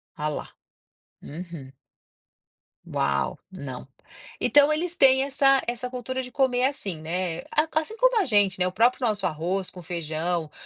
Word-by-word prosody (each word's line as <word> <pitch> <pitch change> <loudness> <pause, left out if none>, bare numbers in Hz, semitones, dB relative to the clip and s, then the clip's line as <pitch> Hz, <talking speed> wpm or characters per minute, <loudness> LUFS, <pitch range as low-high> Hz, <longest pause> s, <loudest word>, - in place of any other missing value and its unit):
Ah, 150 +1 -2
lá, 150 - -5 0.8
uhum. 160 -4 -9 1.1
Uau, 70 0 -1
não, 140 -10 -8 0.5
então 290 +1 +5
eles 340 +3 -1
têm 265 0 +6
essa 275 -1 +3
essa 245 +1 -3
cultura 255 +1 -4
de 250 - -8
comer 255 -1 +2
assim, 235 - -2
né, 170 +1 -2 0.3
assim 315 +8 -1
como - - +3
a 395 - +2
gente, 205 -5 +2
né, 180 - +3
o 180 - -4
próprio 245 +4 +3
nosso 205 -3 0
arroz 180 +4 -2
com 180 - -11
feijão, 165 -1 -3
205 Hz, 145 wpm, -25 LUFS, 170-265 Hz, 1.1 s, têm